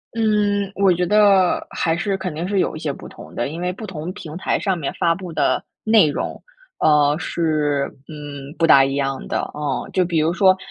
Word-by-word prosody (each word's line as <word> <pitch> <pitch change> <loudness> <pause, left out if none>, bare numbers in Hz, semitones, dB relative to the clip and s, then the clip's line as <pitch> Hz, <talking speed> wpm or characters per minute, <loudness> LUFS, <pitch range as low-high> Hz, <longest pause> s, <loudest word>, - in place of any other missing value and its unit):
嗯， 205 -3 +1
我 195 -1 +3
觉 180 0 +1
得 200 -2 +4
还 165 -1 0
是 195 +2 -1
肯 185 -3 -4
定 165 +4 -4
是 200 - -1
有 - - 0
一 - - -6
些 155 -2 -2
不 - - -10
同 - - -13
的， 120 - -1
因 165 +4 -6
为 180 - -1
不 205 +4 -8
同 175 -2 -6
平 160 -5 -9
台 - - 0
上 190 -2 0
面 150 -5 -3
发 170 -1 +2
布 180 0 -7
的 - - +1 0.2
内 220 -6 +5
容， - - -4 0.4
呃， 150 -1 +4
是， 150 -5 0 0.2
嗯， 145 -2 -8
不 165 - +3
大 140 -4 +7
一 135 0 -1
样 135 -1 -2
的， - - -1 0.2
嗯。 145 -3 -3
就 185 - +3
比 170 -2 -1
如 160 +2 +1
说， 190 0 +4
170 Hz, 230 characters per minute, -21 LUFS, 150-190 Hz, 0.4 s, 大